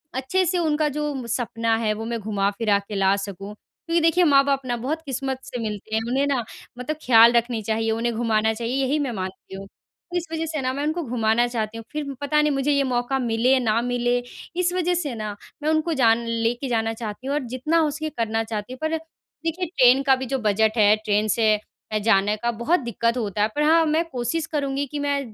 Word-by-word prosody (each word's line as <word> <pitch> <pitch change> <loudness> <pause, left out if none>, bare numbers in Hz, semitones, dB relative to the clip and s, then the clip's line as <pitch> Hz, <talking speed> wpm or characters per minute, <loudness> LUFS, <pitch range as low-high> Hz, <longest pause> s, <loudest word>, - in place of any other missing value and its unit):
अच्छे 265 +9 +1
से 360 +2 0
उनका 310 -2 +1
जो 290 -5 -3
सपना 230 -1 0
है 220 -2 0
वो 220 +1 -6
मैं 230 0 -3
घुमा-फिरा 205 0 0
के 200 +1 -8
ला 195 0 +3
सकूँ। 200 0 -6
क्योंकि 335 +10 -3
देखिए, 330 +2 +4
माँ-बाप 275 -3 +4
ना 245 -1 -1
बहुत 285 +7 -3
किस्मत 270 -1 -3
से 250 -1 -6
मिलते 215 0 -4
हैं। 220 - +1
उन्हें 265 +3 +1
ना 270 -4 0 0.3
मतलब 270 +5 -4
ख्याल 235 -1 +7
रखनी 235 -1 0
चाहिए 225 +1 -1
उन्हें 230 +2 -1
घुमाना 220 -1 +1
चाहिए 235 +3 -3
यही 285 +3 +1
मैं 275 -4 -1
मानती 190 -1 -6
हूँ। 195 +1 -7
तो 350 - -10
इस 345 - -2
वजह 325 0 -2
से 310 -3 -3
ना 255 - 0
मैं 280 - -3
उनको 315 +3 -1
घुमाना 235 -2 +1
चाहती 225 -2 -3
हूँ 225 - -7
फ़िर 295 -2 -4
पता 300 +1 +2
नहीं 300 0 +2
मुझे 275 +1 +1
ये 280 -1 +3
मौका 255 +1 0
मिले 235 0 +1
या 265 - +4
ना 230 -2 +1
मिले। 245 0 0 0.4
इस 360 0 +1
वजह 360 -1 +1
से 310 -8 -2
ना 215 -2 -5 0.3
मैं 305 - +1
उनको 315 +1 +1
जान 230 +1 +4
लेके 230 +3 -1
जाना 225 -1 0
चाहती 225 +2 -7
हूँ 280 - 0
और 300 - 0
जितना 305 +6 +1
हो 315 -2 +3
सके 310 +1 -4
करना 225 -5 -1
चाहती 220 +2 -5
हूँ। - - -9
पर 315 +1 0
देखिए 330 +2 -6
ट्रेन 265 -5 +4
का 270 -1 +5
भी 260 0 -5
जो 265 +2 -1
बजट 220 0 +1
है 210 -1 +6
ट्रेन 210 +1 +2
से 220 0 +3 0.4
अ, 215 - +1
जाने 205 -1 +3
का 235 - +2
बहुत 235 +10 +1
दिक़्क़त 235 -1 -1
होता 210 -3 -2
है 210 - +4
पर 300 - +1
हाँ 325 +2 +5
मैं 315 +2 +2
कोशिश 255 +4 -2
करूँगी 280 -2 -1
कि 295 - -3
मैं 285 0 0
245 Hz, 225 wpm, -23 LUFS, 225-295 Hz, 0.4 s, ख्याल